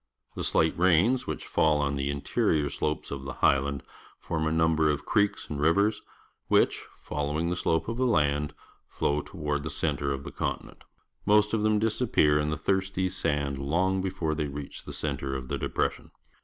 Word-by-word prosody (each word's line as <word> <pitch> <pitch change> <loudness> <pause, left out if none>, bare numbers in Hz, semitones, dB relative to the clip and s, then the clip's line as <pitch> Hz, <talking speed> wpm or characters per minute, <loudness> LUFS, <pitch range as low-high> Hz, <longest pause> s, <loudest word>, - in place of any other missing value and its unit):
The - - -4
slight 80 0 +2
rains 95 +8 +3
which - - -4
fall 80 -1 +2
on 70 -1 0
the 70 0 -1
interior 70 +1 0
slopes 75 +1 -2
of 70 -1 -4
tlie 65 -1 -6
highland 70 0 +2 0.3
form 80 -2 -2
a - - 0
number 80 -1 +3
of 70 -1 -1
creeks 100 -2 +1
and 75 -1 -4
ri\ 80 - +5
ers, 100 +5 +2 0.5
which, - - +2
following 75 +3 -2
the - - 0
slope 80 -2 0
of 115 +1 -3
the 130 0 +2
land, 75 -7 +1 0.3
flow 75 +1 0
toward 75 -1 -3
the 80 - -4
centre 70 -3 -1
of 70 0 -3
the - - -7
continent. - - -5 0.4
Most 105 +1 +4
of 110 - +1
them 110 0 +3
disappear 105 -9 +2
in 75 0 0
the 75 - -2
thirsty 95 -1 0
sand 75 -6 -1
long 90 +7 +1
before 90 -4 -2
they 75 -1 -2
reach 70 0 -7
the - - -7
centre 70 0 -3
of 65 -1 -6
the - - -2
depression. - - -2
80 Hz, 185 wpm, -28 LUFS, 70-95 Hz, 0.5 s, ri